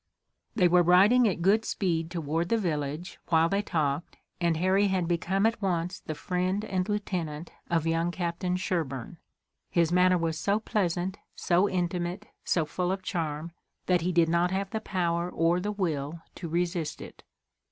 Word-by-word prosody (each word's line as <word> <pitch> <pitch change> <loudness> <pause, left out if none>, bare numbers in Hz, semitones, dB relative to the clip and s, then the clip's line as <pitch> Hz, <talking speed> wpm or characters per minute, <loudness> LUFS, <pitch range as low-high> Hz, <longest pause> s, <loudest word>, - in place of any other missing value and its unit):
They 180 -6 +5
were 175 +1 +5
riding 200 +8 +6
at 175 -4 -1
good 210 +4 +4
speed 165 -7 -1
toward 165 0 -2
the 230 - +3
village, 155 -3 -3
while 165 -1 +4
they 200 +4 +1
talked, 155 -5 -2 0.2
and 170 -2 +1
Harry 190 +4 +3
had 185 -3 0
become 180 +4 +1
at 225 0 +1
once 180 -2 -1
the 155 - -6
friend 185 +5 -1
and 185 -1 -2
lieutenant 175 -6 -3 0.2
of 165 -2 +1
young 165 +1 +1
Captain 175 0 -2
Sherburne. 165 -6 -3 0.5
His 170 -1 +2
manner 180 0 +4
was 165 -1 -1
so 205 +1 +1
pleasant, 185 -3 -1 0.2
so 185 +3 +2
intimate, 180 +2 -2 0.2
so 165 -3 +1
full 180 +4 -2
of 190 0 -3
charm, 165 -4 -3 0.3
that 180 -2 +2
he 180 +2 0
did 170 -2 +4
not 170 +2 +2
have 195 +1 -2
the 220 - -2
power 175 -3 -1
or 170 +1 +2
the 205 +3 -2
will 165 -5 -3
to 170 - -7
resist 170 -1 -1
it. - - -11
175 Hz, 170 wpm, -28 LUFS, 165-190 Hz, 0.5 s, riding